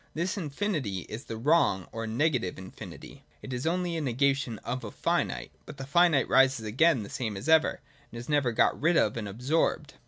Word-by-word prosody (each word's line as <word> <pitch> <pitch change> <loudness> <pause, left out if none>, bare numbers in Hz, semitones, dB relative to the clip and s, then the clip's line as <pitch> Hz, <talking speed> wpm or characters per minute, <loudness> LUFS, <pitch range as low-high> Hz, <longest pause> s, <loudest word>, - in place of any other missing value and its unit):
94.]tThis 185 +6 -2
Infinity 150 - -2
is 110 +5 -7
the 115 - -6
wrong 120 - +2
or 115 -1 -5
negative 125 - 0
infinit}': 95 0 -11 0.2
it 130 - -6
is 125 +5 -3
only 175 0 -1
a 160 - -2
negation 135 -2 0
of 125 +2 -3
a - - -5
finite: - - -1 0.2
but - - -9
the 135 - -6
finite 160 -1 +3
rises 135 -4 +3
again 130 +3 +3
the - - -8
same 110 -4 -4
as 95 - -7
ever, 160 0 +3 0.3
and 115 - -9
is 120 - -8
never 145 -5 +2
got 115 - +2
rid 170 +3 +3
of 105 - +2
and 110 -3 -4
absorbed. 135 +6 -1
135 Hz, 195 wpm, -28 LUFS, 115-160 Hz, 0.3 s, finite